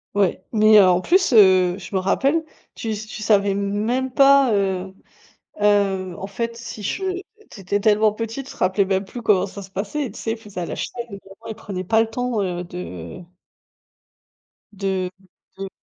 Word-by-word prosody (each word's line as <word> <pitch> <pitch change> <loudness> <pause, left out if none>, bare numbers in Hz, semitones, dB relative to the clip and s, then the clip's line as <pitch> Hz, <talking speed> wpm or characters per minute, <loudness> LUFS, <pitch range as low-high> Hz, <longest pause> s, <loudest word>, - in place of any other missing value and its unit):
Ouais, 195 -2 +1
mais, 215 0 +6
heu, 195 - +7
en 180 0 +3
plus, 365 - +2
heu 185 -4 +6
je 210 - -11
me - - +3
rappelle 275 - +1 0.3
tu 225 - -5
s 215 0 -4
tu 215 - -8
savais 205 -2 +3
même 210 +6 -1
pas, 275 -1 +5
heu 190 -2 -1 0.7
heu, 195 -3 +2
en 195 - -6
fait 230 +3 -4
si 230 -2 -8
je 385 - -3 0.5
tu - - -12
étais 200 +2 -1
tellement 210 0 +3
petit, 225 +4 -4
tu 270 - -11
te - - -12
rappelais 190 +2 +2
même 190 0 0
plus 240 +5 -8
comment 200 -5 +3
ça 200 +1 -9
se 195 - -11
passait, 215 +9 -3
tu 205 - -12
sais? 225 - -3
Ils 225 - -3
faisaient 210 -4 -8
à - - -2
la - - -5
chaine, 240 -1 -5
vraiment, 200 +1 -12
ils 220 - -5
prenaient 190 -4 -6
pas 220 +4 +2
le 225 - -1
temps, 245 -1 -2
heu, 180 -2 -2
de 90 - -8 1.5
de 190 -2 -2 0.5
de. 195 0 -5
205 Hz, 195 wpm, -22 LUFS, 190-225 Hz, 1.5 s, heu